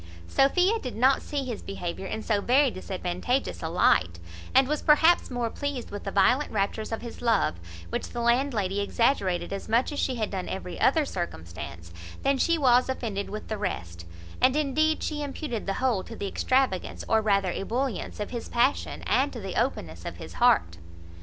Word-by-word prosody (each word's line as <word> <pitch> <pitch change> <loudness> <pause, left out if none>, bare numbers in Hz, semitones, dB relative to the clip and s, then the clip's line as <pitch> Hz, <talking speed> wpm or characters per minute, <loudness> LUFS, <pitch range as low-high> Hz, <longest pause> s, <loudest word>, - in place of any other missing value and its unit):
Sophia 360 - +3
did 250 - -6
not 260 +4 +4
see 285 -2 -3
his 240 -4 -5
behaviour 190 -1 -5
in 220 - -4
so 210 -3 +1
very 260 +4 +4
disadvantageous 185 +7 -2
a 160 - -3
light, 90 - +3 0.4
and 265 0 +6
was 300 +1 -1
perhaps 320 +3 +5
more 240 -3 -2
pleased 285 -4 -4
with 205 - -7
the 195 - -2
violent 240 +10 +3
raptures 215 +1 -1
of 225 - -3
his 235 - -8
love 220 - +2 0.3
(which - - -3
the 240 - -5
landlady 235 -5 +1
exaggerated 200 -4 +1
as 195 - -6
much 235 +6 +2
as 290 - -4
she 260 - 0
had 220 -3 -2
done 190 -2 -4
every 180 -2 -5
other 300 +3 +4
circumstance) 85 - -6 0.3
than 275 0 +2
she 335 +4 +3
was 255 -3 +4
offended 215 -6 -3
with 215 +1 -6
the 215 -2 -4
rest; 85 - -4 0.3
and 255 +2 +5
indeed 305 +2 +1
she 300 -1 -2
imputed 280 -6 -4
the 195 - +1
whole 245 -8 +1
to 230 - -9
the 200 - -4
extravagance, 255 -3 0
or 220 0 +3
rather 200 -3 +2
ebullience, 235 +5 -3
of 210 - -4
his 235 -2 -5
passion, 245 +4 +1
and - - +2
to - - -7
the - - -5
openness - - -2
of - - -6
his - - -9
heart. 225 - +4
230 Hz, 185 wpm, -27 LUFS, 195-270 Hz, 0.4 s, and